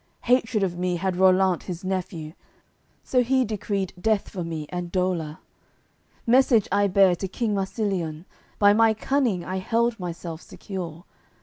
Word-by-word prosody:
Hatred 230 -4 +2
of 175 -2 -2
me 180 0 0
had 185 +1 -1
Rollant, 185 -1 +4
his 180 0 -7
nephew; 180 -4 -4 0.7
So 255 - +2
he 260 +1 +2
decreed 200 -3 -3
death 220 -1 +1
for 180 -3 -5
me 160 -2 -4
and 175 -1 -5
dolour. 175 -5 -1 0.9
Message 240 -3 +4
I 205 0 +3
bare 190 -1 +5
to 195 - -3
king 215 +3 -2
Marsiliun; 190 -5 -2 0.3
By 205 0 +6
my 225 0 +4
cunning 230 -6 0
I 185 - -3
held 230 +4 0
myself 170 -2 -6
secure. 175 -3 -7
190 Hz, 145 wpm, -25 LUFS, 175-220 Hz, 0.9 s, By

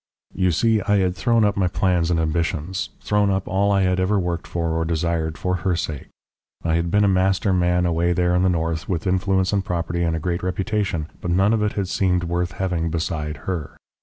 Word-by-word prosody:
"You 95 -1 +1
see, 110 +6 +2
I 105 +1 +2
had 90 -2 +1
thrown 115 +2 +2
up 105 -1 +1
my 95 -2 +1
plans 90 -2 +1
and 85 -2 +1
ambitions, 85 +3 -1
thrown 105 -1 +1
up 95 -1 -1
all 100 +1 +1
I 100 -1 +3
had 90 0 +1
ever 95 +3 +2
worked 90 -2 -3
for 85 -1 -2
or 80 0 0
desired 80 -1 -1
for 90 0 -1
her 90 -1 0
sake. 80 -4 -4 0.6
I 80 - 0
had 85 +1 0
been 105 +4 +3
a - - +4
master 95 +1 +2
man 90 0 +2
away 85 0 +1
there 90 0 +1
in 90 - +2
the 95 - +3
north, 80 -2 -2
with 85 -4 -2
influence 95 +1 +1
and 100 -1 +1
property 85 -1 -2
and 85 -1 +1
a - - -2
great 85 +2 -2
reputation, 95 -2 -1 0.2
but 90 - -3
none 95 +5 +3
of 110 - +1
it 105 0 0
had 100 -2 -2
seemed 90 -1 +1
worth 85 +1 -2
having 90 -3 -1
beside 80 -2 -3
her. 90 -5 -4
90 Hz, 220 wpm, -22 LUFS, 85-95 Hz, 0.6 s, a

